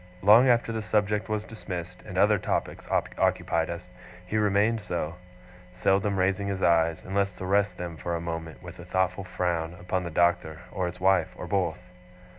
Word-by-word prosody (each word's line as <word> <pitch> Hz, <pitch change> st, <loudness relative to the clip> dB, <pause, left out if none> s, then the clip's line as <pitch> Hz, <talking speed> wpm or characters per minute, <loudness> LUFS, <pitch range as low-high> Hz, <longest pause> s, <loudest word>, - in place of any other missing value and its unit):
Long 110 Hz, +6 st, +7 dB
after 120 Hz, -1 st, +3 dB
the 110 Hz, -1 st, -2 dB
subject 105 Hz, 0 st, 0 dB
was 110 Hz, 0 st, -1 dB
dismissed, 90 Hz, -6 st, -7 dB
and -, -, -8 dB
other -, -, +4 dB
topics -, -, -2 dB
occupied 80 Hz, -1 st, 0 dB
us, 90 Hz, +1 st, -7 dB, 0.3 s
he 90 Hz, -, -5 dB
remained 105 Hz, +2 st, +2 dB
so; 85 Hz, -4 st, -3 dB, 0.6 s
seldom 95 Hz, +2 st, +1 dB
raising 95 Hz, +2 st, +1 dB
his 100 Hz, -1 st, -2 dB
eyes, 85 Hz, -1 st, +3 dB
unless 100 Hz, -1 st, -1 dB
to 95 Hz, -, -5 dB
rest 100 Hz, +2 st, +1 dB
them 85 Hz, -2 st, -6 dB
for 85 Hz, +2 st, -3 dB
a -, -, -2 dB
moment, 80 Hz, -1 st, -6 dB
with 90 Hz, 0 st, -10 dB
a -, -, -8 dB
thoughtful 95 Hz, +1 st, 0 dB
frown, 85 Hz, -2 st, -2 dB
upon 90 Hz, +1 st, -2 dB
the 85 Hz, -, -4 dB
Doctor, 85 Hz, -1 st, +1 dB
or 90 Hz, -1 st, -1 dB
his 90 Hz, +1 st, -7 dB
wife, 90 Hz, -2 st, +3 dB
or -, -, -6 dB
both. 95 Hz, -3 st, 0 dB
95 Hz, 180 wpm, -27 LUFS, 85-100 Hz, 0.6 s, Long